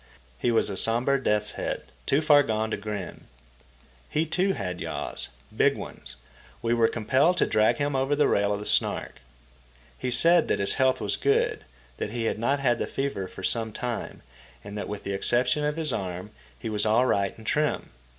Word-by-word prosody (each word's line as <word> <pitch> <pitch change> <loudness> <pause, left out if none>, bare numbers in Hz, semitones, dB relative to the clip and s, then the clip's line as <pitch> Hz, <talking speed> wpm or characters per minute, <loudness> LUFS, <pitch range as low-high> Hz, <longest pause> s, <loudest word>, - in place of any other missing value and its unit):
He - - +1
was 115 -3 +2
a 95 - -4
sombre 125 +6 +3
death's 105 0 +1
head, - - -4 0.2
too 140 - +3
far 150 -2 +6
gone 110 -4 -1
to - - +1
grin. 100 -3 -6 0.8
He, 155 +2 +1
too, 185 +5 +1
had 90 - -4
yaws, - - -3 0.3
big - - +3
ones. - - -8 0.5
We 115 0 +2
were 115 -1 +4
compelled 130 +11 +2
to - - +4
drag 110 0 +3
him 145 -1 -1
over 135 +2 +1
the 150 - +3
rail 100 0 +2
of 100 - -1
the 105 - -7
Snark. - - 0 0.8
He 130 - -2
said 165 +8 +4
that - - +1
his 100 - 0
health 130 0 +3
was 100 - -1
good, 140 - +1 0.3
that - - -3
he 115 +1 -3
had 110 - -1
not 140 +5 +1
had 120 -3 +2
the - - -1
fever 135 -9 -3
for 95 - -11
some 115 +1 0
time, 120 +2 -5 0.4
and 100 - -8
that 105 - -4
with 105 -1 -5
the 100 - -3
exception 125 +9 +1
of 150 +1 -1
his 155 -5 0
arm 90 +1 -4 0.3
he - - -6
was 105 -2 0
all 110 +4 +4
right 100 -5 0
and 110 - -13
trim. 150 +5 0
115 Hz, 200 wpm, -26 LUFS, 105-140 Hz, 0.8 s, far